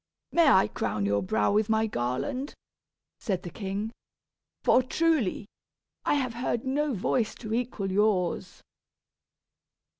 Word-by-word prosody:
"May 335 -2 +4
I 190 -7 +5
crown 105 -2 -2
your 100 0 +1
brow 100 +2 +1
with 210 +1 +2
my 220 0 +3
garland?" 220 - -2 0.6
said 190 -6 -2
the 175 - -7
king. 205 +2 -4 0.7
"For 255 - +5
truly, 270 - +1 0.6
I - - +3
have 255 -4 -1
heard 240 0 -2
no 280 0 0
voice 215 +3 0
to 220 -2 -6
equal 225 -5 -2
yours." 195 -3 0
220 Hz, 125 wpm, -28 LUFS, 190-255 Hz, 0.7 s, I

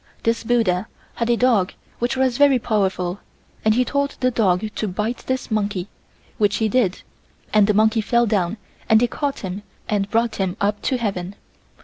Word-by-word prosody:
This 230 0 +1
buddha 220 -5 +1 0.3
had 235 0 -2
a 235 - +3
dog 225 -7 +2 0.3
which 245 +2 -1
was 260 -1 +1
very 285 -2 +6
powerful 195 -5 -1 0.4
and 215 0 +3
he 250 +1 +3
told 280 +1 -1
the 255 -1 +2
dog 195 -4 +2
to 215 - -2
bite 210 +6 -2
this 260 -2 -2
monkey, 205 -3 -1 0.5
which 205 -1 +3
he 220 - +1
did, 210 -4 +1 0.5
and 210 -2 +5
the 210 - +2
monkey 220 +1 +3
fell 235 +3 +2
down 205 -2 0 0.3
and 220 - +6
they 245 - +3
caught 280 +3 -3
him 190 +1 -5 0.3
and 200 -1 0
brought 230 0 +1
him 190 -1 -1
up 205 +1 0
to 260 - 0
heaven. 195 -4 -3
220 Hz, 185 wpm, -21 LUFS, 200-240 Hz, 0.5 s, very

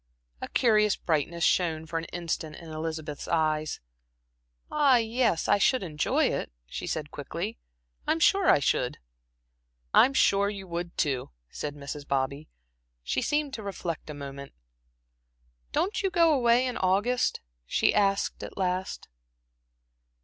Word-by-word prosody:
A - - -4
curious 215 -4 +3
brightness 165 +1 -1
shone 160 -3 +2
for 165 +1 -2
an 165 - -6
instant 165 -3 -4
in 165 -2 -10
Elizabeth's 155 -2 -5
eyes. 155 -2 0 0.9
"Ah, 290 -3 +5
yes, 230 -6 +1
I - - +4
should 255 +2 +3
enjoy 155 -4 +1
it," - - -1
she - - -6
said, - - -3
quickly. - - -5 0.5
"I'm 325 - +2
sure 390 +2 +4
I - - +7
should." 125 -3 0 1.0
"I'm 270 +1 +6
sure 200 -4 +4
you 200 -2 -6
would, 175 0 -5
too," 135 -5 0 0.2
said 145 -1 -5
Mrs. 145 0 -7
Bobby. 140 +2 -1 0.5
She 125 - -1
seemed 295 -2 0
to 220 - -5
reflect 180 -6 -5
a 150 - -6
moment. 140 -1 -8 1.2
"Don't 395 +5 0
you 390 - +1
go 335 -4 +4
away 245 -2 +4
in 250 - -2
August?" 205 +7 +1 0.3
she - - +2
asked 200 -1 +1
at - - -8
last. 185 0 -2
175 Hz, 140 wpm, -28 LUFS, 155-235 Hz, 1.2 s, I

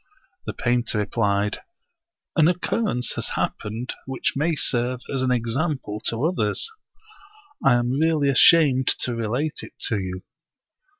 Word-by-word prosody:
The - - -2
painter 120 -2 0
replied, 105 -1 0 0.7
"An 160 -2 +5
occurrence 180 - 0
has - - -1
hap - - -1
pened 115 +4 -5 0.2
which 135 -1 -1
may 155 +4 +1
serve 125 -2 0
as 135 - -1
an 130 - +1
example 125 -1 -1
to 115 +3 0
others; 160 - 0 1.0
I 135 -3 +5
am 120 0 +1
really 150 0 +2
ashamed 135 -2 +5
to 125 - -1
relate 120 +7 -2
it - - -11 0.2
to 110 -4 0
you." 95 -1 -5
125 Hz, 135 wpm, -23 LUFS, 115-150 Hz, 1.0 s, An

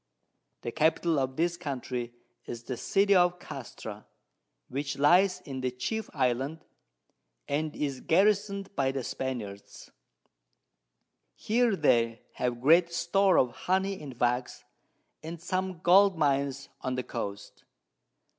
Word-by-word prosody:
The 120 - -4
Capital 160 +2 +2
of 130 -1 -2
this 170 +2 0
Country 125 -4 -4 0.4
is 115 -1 -6
the 125 - -4
City 200 - +2
of 180 -1 +4
Castra, - - -9 0.6
which 140 +1 -3
lies 180 +6 +4
in 135 -2 -6
the 130 - 0
chief 215 - -4
Island, 135 +4 -1 0.8
and 150 +2 -2
is 140 -3 -2
garrison'd 200 +2 +1
by 135 -1 +1
the 135 -1 -3
Spaniards. 115 -7 -6 1.4
Here 230 -1 +2
they 115 -8 +2
have 120 -1 -2
great 170 +5 +5
Store 185 +3 +3
of 125 - +3
Honey 190 +7 -1
and 135 -5 -9
Wax, 125 +1 0 0.6
and 165 +1 -7
some 185 0 -3
Gold 190 +1 +5
Mines 140 -2 0
on 130 0 -2
the 125 - -2
Coast. 100 -5 -6
145 Hz, 125 wpm, -29 LUFS, 130-180 Hz, 1.4 s, great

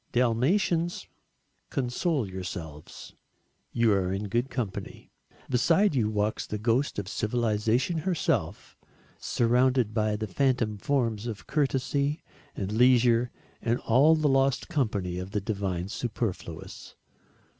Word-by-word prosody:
Dalmatians, 160 - +1 0.6
console 135 - -1
yourselves, 85 -5 -8 0.6
you 115 -2 +3
are 95 -2 0
in 100 +1 -3
good 120 +5 0
company. 120 -6 -5 0.4
Beside 165 - +3
you 115 -6 +1
walks 105 0 -1
the 105 - -3
ghost 115 +6 0
of 100 -3 -3
civilisation 115 - 0
herself 150 - -1 0.4
surrounded 125 -1 +2
by 110 -1 +1
the 110 +1 -3
phantom 115 -1 0
forms 115 -4 0
of 110 -4 -6
courtesy 140 +1 0 0.3
and 100 0 -3
leisure 120 0 +4 0.3
and 120 +1 +1
all 140 +8 +5
the 155 -1 +1
lost 135 -1 +2
company 100 - -1
of 95 +2 -7
the 105 - +1
divine 95 -3 -2
superfluous. 100 -7 -5
115 Hz, 115 wpm, -27 LUFS, 105-135 Hz, 0.6 s, all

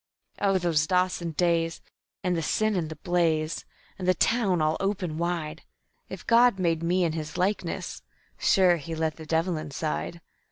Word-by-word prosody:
"Oh, 195 -2 +3
those 165 -4 +1
Dawson 180 -2 0
days, 165 0 +1 0.4
and 180 -2 +1
the 165 - 0
sin 215 +6 +1
and 165 -4 -1
the 160 - -6
blaze, 160 -1 0 0.3
and 185 - -3
the 185 - +4
town 205 -6 +2
all 155 +1 +2
open 185 -5 -2
wide! 165 -2 -2 0.5
(If - - -8
God 235 -2 +5
made 165 -3 +1
me 180 +2 +2
in 165 - +1
His 155 -1 -5
likeness, 190 +3 -2 0.4
sure 180 -3 +4
He 165 +2 -6
let 160 -1 -1
the 160 -1 -10
devil 165 +1 +1
inside.) 155 +2 -3
170 Hz, 165 wpm, -27 LUFS, 160-185 Hz, 0.5 s, God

